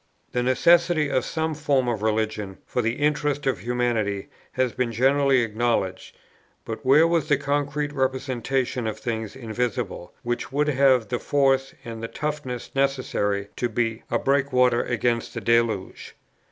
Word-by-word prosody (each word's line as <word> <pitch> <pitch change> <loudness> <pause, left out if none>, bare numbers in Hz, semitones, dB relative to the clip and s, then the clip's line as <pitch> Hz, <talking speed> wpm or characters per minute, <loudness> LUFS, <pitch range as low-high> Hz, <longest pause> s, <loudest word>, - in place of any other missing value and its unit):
The 125 - 0
necessity 160 +4 +3
of 130 - +1
some 160 0 -2
form 145 -4 +1
of 115 -4 -1
religion 110 -2 -1
for 125 - -1
the 115 0 0
interests 145 0 0
of 135 -8 0
humanity, 115 -3 -1 0.2
has 130 -2 0
been 125 -2 -1
generally 135 +2 +3
acknowledged: 110 -4 -1 0.5
but 110 - -6
where 145 +5 +6
was 165 -3 0
the 145 - +4
concrete 145 +1 -1
representative 130 -2 -1
of 110 - -3
things 110 -3 -4
invisible, 115 -6 -3
which 120 +2 -3
would 150 +2 +1
have 130 -4 +3
the 125 -1 -1
force 135 -2 +1
and 115 -1 -6
the 115 - -3
toughness 145 -4 -4
necessary 130 -7 0
to 120 - 0
be 115 0 -1
a - - +1
breakwater 130 -3 +2
against 120 -1 -1
the - - -2
deluge? 115 -3 0
125 Hz, 150 wpm, -24 LUFS, 115-140 Hz, 0.5 s, where